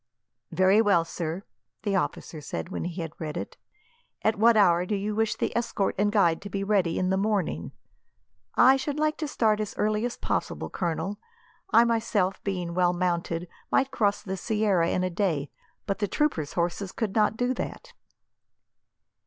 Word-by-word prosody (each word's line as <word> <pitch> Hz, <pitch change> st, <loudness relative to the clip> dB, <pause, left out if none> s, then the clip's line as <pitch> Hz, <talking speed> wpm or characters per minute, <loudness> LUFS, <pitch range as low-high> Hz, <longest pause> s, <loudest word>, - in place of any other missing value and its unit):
"Very 190 Hz, +3 st, +4 dB
well, 200 Hz, -6 st, +3 dB
sir," 165 Hz, +2 st, -4 dB, 0.4 s
the 205 Hz, -2 st, 0 dB
officer 165 Hz, -3 st, -2 dB
said, 150 Hz, -, -5 dB
when 190 Hz, -, -4 dB
he 175 Hz, 0 st, -4 dB
had 160 Hz, -1 st, -7 dB
read 155 Hz, -1 st, -4 dB
it. -, -, -5 dB, 0.7 s
"At 220 Hz, -, +3 dB
what 230 Hz, +1 st, +6 dB
hour 175 Hz, -4 st, +5 dB
do 205 Hz, +3 st, -1 dB
you 205 Hz, +2 st, -2 dB
wish 220 Hz, 0 st, +1 dB
the -, -, -2 dB
escort 230 Hz, -4 st, 0 dB
and 205 Hz, 0 st, +3 dB
guide 175 Hz, -6 st, +3 dB
to 200 Hz, -, -7 dB
be 195 Hz, 0 st, -2 dB
ready 195 Hz, -5 st, +1 dB
in 185 Hz, 0 st, +1 dB
the 190 Hz, -, +2 dB
morning?" 195 Hz, -, -1 dB, 0.8 s
"I 260 Hz, +2 st, +7 dB
should 285 Hz, +2 st, -3 dB
like 305 Hz, 0 st, +1 dB
to 310 Hz, -, -3 dB
start 215 Hz, -6 st, +2 dB
as 210 Hz, -1 st, -3 dB
early 215 Hz, +1 st, +1 dB
as 245 Hz, 0 st, -2 dB
possible, -, -, -2 dB
Colonel. 175 Hz, +3 st, -2 dB, 0.5 s
I 235 Hz, -, +6 dB
myself, 220 Hz, -5 st, 0 dB
being 180 Hz, -4 st, -2 dB
well 180 Hz, 0 st, +3 dB
mounted, 175 Hz, -1 st, -1 dB, 0.2 s
might 270 Hz, 0 st, +2 dB
cross 205 Hz, -2 st, +1 dB
the 190 Hz, -2 st, -4 dB
sierra 200 Hz, -4 st, +1 dB
in 185 Hz, -, 0 dB
a 185 Hz, -, -1 dB
day; 170 Hz, -6 st, -1 dB, 0.3 s
but 195 Hz, -2 st, -2 dB
the 205 Hz, -, 0 dB
troopers' 180 Hz, -, 0 dB
horses 175 Hz, +2 st, -1 dB
could 215 Hz, -4 st, -3 dB
not 215 Hz, 0 st, +2 dB
do 245 Hz, +1 st, +1 dB
that." 485 Hz, -, -6 dB
195 Hz, 180 wpm, -27 LUFS, 175-220 Hz, 0.8 s, I